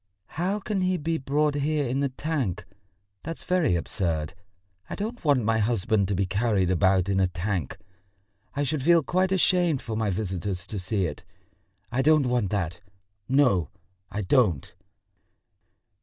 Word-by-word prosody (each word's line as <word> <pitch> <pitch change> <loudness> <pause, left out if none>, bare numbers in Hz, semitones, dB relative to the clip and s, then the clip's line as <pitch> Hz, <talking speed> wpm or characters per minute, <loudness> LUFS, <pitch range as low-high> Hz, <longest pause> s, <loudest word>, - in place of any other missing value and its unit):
"How 185 +6 -1
can 205 -1 -2
he 185 0 +1
be 160 +1 -2
brought 145 +3 +1
here 145 0 0
in 130 +3 -1
the 140 -1 +1
tank? 130 - -3 0.6
That's 165 0 -7
very 180 - +2
absurd. 80 -3 -2 0.6
I - - -4
don't 225 +4 -5
want 140 -6 +3
my 110 +1 +2
husband 110 -2 +1
to 100 - -1
be 95 +2 +1
carried 100 -1 +1
about 95 0 +3
in 95 -1 +1
a 95 - +3
tank. 90 -3 -3 0.8
I 145 - 0
should 145 +1 -1
feel 170 +3 +4
quite 185 +6 +1
ashamed 180 -5 +3
for 115 -3 -5
my 110 -1 0
visitors 95 -2 -3
to 105 0 -5
see 95 +1 -1
it.... 75 - -6 0.7
I 125 +2 +1
don't 155 0 +4
want 120 -5 +1
that, 90 -4 -2 0.5
no, 125 - +3 0.4
I 105 - -3
don't." 95 - +2
115 Hz, 155 wpm, -26 LUFS, 95-150 Hz, 0.8 s, feel